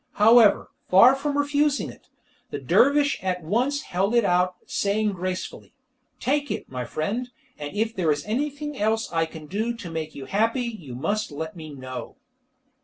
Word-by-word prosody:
However, 220 0 +5 0.2
far 215 +8 +8
from 285 +1 -2
refusing 290 0 +1
it, - - -19 0.4
the - - -4
dervish 285 0 +3
at 180 -2 -2
once 250 - 0
held 195 +6 0
it 235 -3 +4
out, 180 0 +2
saying 210 +1 0
gracefully, 185 0 -5 0.4
"Take 285 +2 0
it, - - -4
my 125 -1 -4
friend, 210 - -3 0.3
and 145 +4 -6
if 220 +2 -1
there 170 -5 +2
is 145 -1 -2
anything 290 +6 -2
else 220 0 0
I 165 0 +1
can 160 -1 -10
do 220 +8 -2
to 195 -8 -8
make 160 -1 -5
you 135 - -7
happy 225 - +1
you 180 - -6
must 205 - -1
let 160 +4 -5
me 160 -2 -9
know." 130 -3 -7
205 Hz, 170 wpm, -25 LUFS, 165-245 Hz, 0.4 s, far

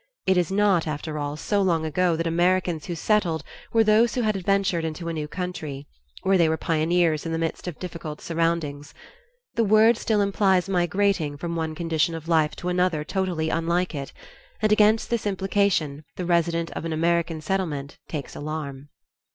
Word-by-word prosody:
It 190 - +3
is 180 0 +1
not, 195 -4 +3
after 150 0 -4
all, 145 +1 -3
so 200 +5 0
long 170 -4 +1
ago 175 +2 +1
that 165 +1 -2
Americans 175 -1 +1
who 175 - -3
settled 170 -4 +1 0.3
were 225 -1 +4
those 220 +2 +4
who 250 - +1
had 215 -1 +1
adventured 195 -2 +1
into 160 +1 -4
a - - -2
new 155 -2 -3
country, 155 -6 -5 0.4
where 190 -1 +3
they 165 -2 +4
were 160 - 0
pioneers 165 -1 +1
in 165 - -4
the 165 - -1
midst 165 +2 -3
of 175 - -5
difficult 165 -4 -6
surroundings. 165 -4 -2 0.6
The 230 - +2
word 220 +2 +5
still 215 -3 +1
implies 195 -2 +2
migrating 180 -4 +1
from 170 +2 -4
one 160 -1 -2
condition 165 0 0
of 165 0 -8
life 160 -2 +2
to 180 - -4
another 180 -3 +1
totally 170 -2 -1
unlike 170 +2 0
it, 140 -2 -5 0.5
and 215 -1 +1
against 215 +2 +4
this 235 -3 0
implication 190 -7 0
the 180 - -4
resident 170 -1 +1
of - - -5
an 165 -1 -2
American 170 0 +1
settlement 155 -6 -3
takes 150 -5 -5
alarm. 145 -2 -5
170 Hz, 180 wpm, -25 LUFS, 160-190 Hz, 0.6 s, word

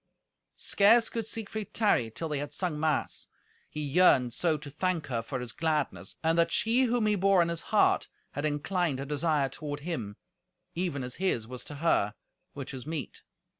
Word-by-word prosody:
Scarce 225 +4 +4
could 230 -2 -3
Siegfried 220 -2 -4
tarry 200 - +3
till 160 +9 -5
they 150 -2 -2
had 145 0 -5
sung 175 -5 -2
mass, 155 -1 0 0.4
he 150 - -4
yearned 140 -5 +4
so 165 +2 +1
to 145 -1 -10
thank 175 +2 -1
her 120 -3 -2
for 130 +3 -4
his 125 -2 -5
gladness, 155 -2 -1
and 165 +1 +2
that 170 - +3
she 235 +3 +3
whom 240 -2 +1
he 210 - +3
bore 195 -1 +4
in 170 - -2
his 170 -1 -2
heart - - +3 0.2
had 145 - -4
inclined 155 +1 0
her 135 - -4
desire 150 0 +1
toward 145 +1 -6
him, 130 - -4 0.6
even 170 -6 -2
as 125 -1 -6
his 150 - +1
was 125 +2 -7
to 145 - -7
her, 140 -9 +1 0.4
which 140 -2 -6
was 130 +1 -7
meet. 155 -4 -4
155 Hz, 185 wpm, -29 LUFS, 140-185 Hz, 0.6 s, Scarce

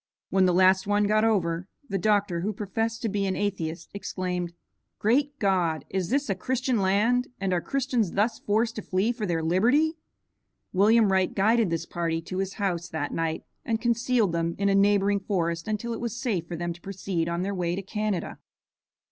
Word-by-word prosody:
When 190 -1 +4
the - - +4
last 185 +2 +4
one 205 0 +3
got 215 +1 +3
over, 180 -5 +1 0.2
the 195 -2 -2
doctor, 205 -3 +2
who 210 +4 -1
professed 225 +3 -3
to - - +1
be 200 -1 0
an 190 - -1
atheist, 170 -5 -3
exclaimed, 180 -3 -3 0.5
"Great 280 +6 +1
God! 175 - +1
is 190 -2 -1
this 280 +4 +1
a 200 - +1
Christian 255 +4 -1
land, 215 +7 +2
and 190 -1 0
are 175 - +1
Christians 250 -7 -1
thus 220 +3 +1
forced 225 +3 0
to - - -2
flee 195 +4 0
for 225 -4 -3
their 165 -2 -1
liberty?" 250 - +2 0.7
William 210 +2 +5
Wright 190 -1 +2
guided 220 +1 +3
this 165 0 -2
party 165 -1 -2
to 185 +3 -5
his 195 0 -2
house 180 -4 -2
that 145 -2 -3
night 165 -1 -2 0.2
and 225 -1 -1
concealed 235 -3 +1
them 170 0 -1
in 200 0 +1
a - - +3
neighboring 200 0 +3
forest 170 -4 -2
until 220 +2 -2
it 225 - -5
was 235 0 -3
safe 195 - -1
for 175 - -5
them 175 +1 -3
to 170 - -16
proceed 185 -3 -3
on 170 +1 -1
their 200 +1 -2
way 175 -2 -1
to 195 - -4
Canada. 210 -2 -3
195 Hz, 195 wpm, -26 LUFS, 175-220 Hz, 0.7 s, William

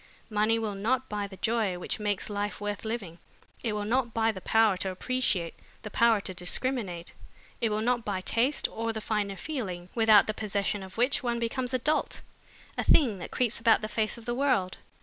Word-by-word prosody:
Money 215 +2 +2
will 220 -2 -2
not 245 +6 0
buy 205 -1 -2
the 195 -1 -12
joy 215 -3 0
which 180 - -4
makes 205 -2 -1
life 205 0 -3
worth 205 -1 -4
living, 205 -7 -4 0.4
it 225 -3 -1
will 210 -1 -2
not 240 +1 0
buy 225 0 +3
the 190 -3 -8
power 220 +1 +4
to 190 +1 -2
appreciate, 190 -4 -1 0.3
the 215 - -7
power 230 -1 +4
to 190 - -6
discriminate. 180 -1 -2 0.5
It 230 - +2
will 215 0 -1
not 240 +1 +1
buy 195 -3 -2
taste 245 +9 +1
or 225 0 -3
the 220 - -3
finer 210 -2 -2
feelings, 185 - -5
without 220 -3 +6
the 215 - -2
possession 205 -1 -2
of 190 +1 -10
which 255 +5 +2
one 240 -2 -1
becomes 245 +2 -2
a 255 - +2
dolt, 300 +5 0 0.6
a - - +2
thing 235 - +4
that 175 - -6
creeps 240 -3 +1
about 225 -1 +4
the 215 - -2
face 220 +1 -1
of 230 - -12
the 240 - -1
world. 245 -9 +1
220 Hz, 205 wpm, -29 LUFS, 200-235 Hz, 0.6 s, without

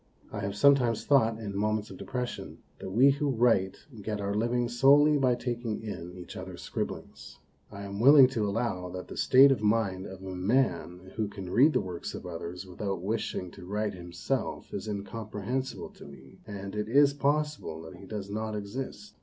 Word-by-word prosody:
I 105 - -5
have 100 0 -3
sometimes 125 -2 +4
thought, 115 -6 +4
in 105 -3 -6
moments 105 +1 -1
of - - -9
depression, 125 -1 -5 0.2
that 95 - -6
we 125 +8 +5
who 145 +1 -1
write 115 -7 +2 0.2
get 105 0 -3
our 100 0 -2
living 120 +3 +1
solely 140 +5 +5
by 130 -2 +3
taking 120 -3 -3
in 90 -5 -6
each 90 -1 -9
other's - - -8
scribblings. 70 0 -6 0.3
I 100 -1 -8
am 100 0 -6
willing 135 +3 +9
to 110 -5 -1
allow 100 -4 -2
that 90 0 -7
the - - -7
state 135 +2 +6
of 130 - +1
mind 105 -3 +1
of 95 0 -10
a 95 -1 -6
man 95 -3 0
who 110 -2 0
can 95 -3 -8
read 145 +9 +5
the - - +2
works 90 -3 -6
of - - -8
others 85 +3 -6
without 95 0 -4
wishing 100 -3 -2
to - - -12
write 105 +2 -1
himself 90 +8 -4
is - - -4
incomprehensible 110 +4 -4
to - - -14
me, 65 -2 -14
and 100 -2 -6
it 105 0 -3
is 140 +3 +5
possible 145 - -1
that 90 +3 -10
he 95 +1 -12
does 105 -2 -5
not 110 +1 -3
exist. 130 - -6
105 Hz, 185 wpm, -29 LUFS, 95-125 Hz, 0.3 s, willing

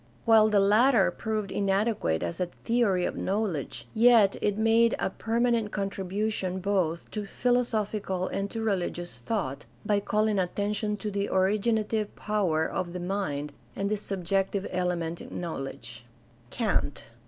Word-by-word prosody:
While 220 -1 +6
the 210 -1 +4
latter 215 +3 +4
proved 215 -3 -3
inadequate 195 - 0
as 85 -1 -4
a 180 - 0
theory 200 -2 0
of - - -2
knowledge, 170 - -2
yet 225 -3 +5
it 205 0 +1
made 225 +1 +4
a - - -1
perma 235 +2 0
nent 225 -3 0
contribution 195 -1 -2
both 185 -4 -1
to 210 -2 -4
philosophical 215 -6 0
and 195 0 -2
to 225 +1 -4
religious 175 -4 -2
thought 145 - -3 0.2
by 205 -1 +2
calling 210 0 +1
attention 205 +3 -1
to 210 +1 -4
the 200 0 -1
originative 210 +2 +1
power 185 -7 0
of 175 0 -3
the 180 - -4
mind 175 -6 -3 0.2
and 200 +1 -2
the - - +3
subjective 195 0 -1
element 175 -2 -1
in - - -7
knowledge. 135 -8 -6 0.5
Kant. 205 - -1
200 Hz, 140 wpm, -28 LUFS, 180-215 Hz, 0.5 s, While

